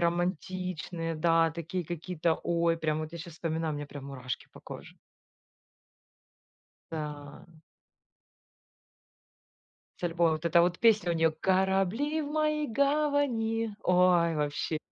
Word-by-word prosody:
романтичные, 175 Hz, -1 st, -2 dB
да, 165 Hz, +1 st, +3 dB
такие 170 Hz, +2 st, -4 dB
какие-то, 170 Hz, 0 st, -1 dB
ой, 170 Hz, -1 st, +1 dB
прям 155 Hz, -1 st, -1 dB
вот 155 Hz, +1 st, -6 dB
я 170 Hz, -, -6 dB
щас 165 Hz, 0 st, -9 dB
вспоминаю, 160 Hz, -1 st, -2 dB
у -, -, -3 dB
меня 145 Hz, 0 st, -5 dB
прям 140 Hz, -1 st, -9 dB
мурашки 130 Hz, -3 st, -5 dB
по -, -, -13 dB
коже. -, -, -10 dB, 2.0 s
Да. 150 Hz, -2 st, -6 dB, 2.6 s
С -, -, -18 dB
альбомом 170 Hz, -1 st, +2 dB
вот 155 Hz, +2 st, -2 dB
эта 170 Hz, +1 st, +5 dB
вот 175 Hz, 0 st, +1 dB
песня 210 Hz, -6 st, +4 dB
у -, -, -1 dB
неё: 165 Hz, 0 st, +3 dB
"Корабли 195 Hz, -, +1 dB
в 290 Hz, -, -5 dB
моей 305 Hz, -1 st, +1 dB
гавани". 255 Hz, -5 st, +1 dB
Ой, 180 Hz, -2 st, +4 dB
вообще! 150 Hz, +1 st, -1 dB
170 Hz, 125 wpm, -29 LUFS, 160-190 Hz, 2.6 s, эта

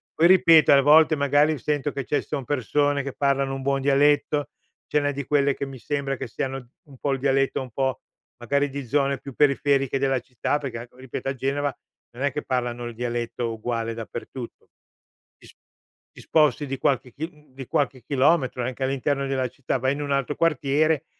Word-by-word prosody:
Poi 165 Hz, -, +5 dB
ripeto 170 Hz, -4 st, +6 dB
a 140 Hz, -, +6 dB
volte 155 Hz, +3 st, +6 dB
magari 145 Hz, +2 st, +2 dB
sento 145 Hz, +3 st, -1 dB
che 140 Hz, -2 st, -5 dB
ce 145 Hz, -, 0 dB
son 140 Hz, -4 st, -5 dB
persone 145 Hz, +2 st, 0 dB
che 140 Hz, -1 st, -5 dB
parlano 140 Hz, -1 st, 0 dB
un 135 Hz, -, -6 dB
buon 140 Hz, 0 st, 0 dB
dialetto, 145 Hz, +1 st, +2 dB, 0.4 s
ce 150 Hz, -, +2 dB
n'è 145 Hz, 0 st, 0 dB
di 140 Hz, 0 st, -5 dB
quelle 140 Hz, 0 st, +2 dB
che -, -, -4 dB
mi 135 Hz, -1 st, -9 dB
sembra 140 Hz, +1 st, -2 dB
che -, -, -5 dB
siano 135 Hz, 0 st, -5 dB
un 140 Hz, -3 st, -16 dB
po' 140 Hz, +2 st, -1 dB
il 135 Hz, -, -2 dB
dialetto 135 Hz, 0 st, +1 dB
un 130 Hz, -, -8 dB
po' 130 Hz, +2 st, -1 dB, 0.4 s
magari 140 Hz, +4 st, 0 dB
di 140 Hz, -1 st, -6 dB
zone 140 Hz, +1 st, +1 dB
più 140 Hz, -, -9 dB
periferiche 140 Hz, -2 st, +2 dB
della 135 Hz, -1 st, +1 dB
città, 125 Hz, +3 st, -2 dB
perché 130 Hz, -5 st, -5 dB
ecco 125 Hz, +1 st, -14 dB
ripeto 130 Hz, +1 st, -5 dB
a -, -, -1 dB
Genova 140 Hz, +2 st, -1 dB, 0.4 s
non 125 Hz, +4 st, -7 dB
è 145 Hz, -, +2 dB
che 150 Hz, +3 st, -4 dB
parlano 120 Hz, -1 st, -2 dB
il 120 Hz, -, -7 dB
dialetto 120 Hz, 0 st, -3 dB
uguale 115 Hz, 0 st, -3 dB
dappertutto. 120 Hz, +2 st, -8 dB, 0.7 s
Ti -, -, -17 dB
sp -, -, -18 dB, 0.6 s
ti -, -, -13 dB
sposti 150 Hz, -2 st, +2 dB
di 135 Hz, 0 st, -3 dB
qualche 130 Hz, -2 st, 0 dB
chil 160 Hz, +4 st, -5 dB
uhm, 150 Hz, -3 st, -24 dB
di 135 Hz, 0 st, -8 dB
qualche 130 Hz, -3 st, -1 dB
chilometro, 135 Hz, -2 st, +2 dB
anche 130 Hz, +2 st, -4 dB
all'interno 135 Hz, +1 st, 0 dB
della 130 Hz, -1 st, 0 dB
città, 130 Hz, 0 st, -3 dB
vai 130 Hz, +2 st, +1 dB
in 145 Hz, -, -5 dB
un 145 Hz, -1 st, -3 dB
altro 140 Hz, +1 st, 0 dB
quartiere 150 Hz, 0 st, +1 dB
135 Hz, 200 wpm, -24 LUFS, 130-145 Hz, 0.7 s, ripeto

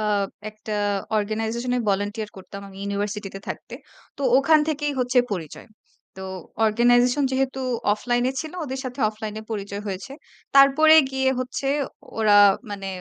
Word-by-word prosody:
আ -, -, -2 dB, 0.5 s
একটা 215 Hz, 0 st, -8 dB, 0.5 s
organization 225 Hz, +3 st, -2 dB
এ -, -, +1 dB
volunteer 205 Hz, +2 st, -2 dB
করতাম 195 Hz, +1 st, -9 dB
আমি 190 Hz, -, -14 dB
ইউনিভার্সিটিতে 200 Hz, 0 st, -4 dB
থাকতে। -, -, -7 dB, 0.4 s
তো 280 Hz, -, -6 dB, 0.2 s
ওখান 310 Hz, +3 st, +5 dB
থেকেই 295 Hz, -1 st, -1 dB
হচ্ছে 250 Hz, 0 st, +2 dB
পরিচয়। 165 Hz, -6 st, -6 dB, 0.5 s
তো 190 Hz, -, -8 dB, 0.4 s
organization 245 Hz, +5 st, +3 dB
যেহেতু 265 Hz, 0 st, -1 dB, 0.3 s
offline 240 Hz, +3 st, 0 dB
এ -, -, -5 dB
ছিল 315 Hz, 0 st, -7 dB
ওদের 265 Hz, -2 st, -5 dB
সাথে 255 Hz, +1 st, -6 dB
offline 215 Hz, 0 st, -6 dB
এ -, -, -11 dB
পরিচয় 200 Hz, -1 st, -4 dB
হয়েছে। 200 Hz, +8 st, -5 dB, 0.4 s
তারপরে 275 Hz, +3 st, +7 dB, 0.2 s
গিয়ে 265 Hz, 0 st, +1 dB
হচ্ছে 255 Hz, +2 st, -4 dB, 0.5 s
ওরা 215 Hz, -2 st, +4 dB, 0.4 s
মানে 200 Hz, -1 st, -5 dB
225 Hz, 145 wpm, -23 LUFS, 205-265 Hz, 0.5 s, তারপরে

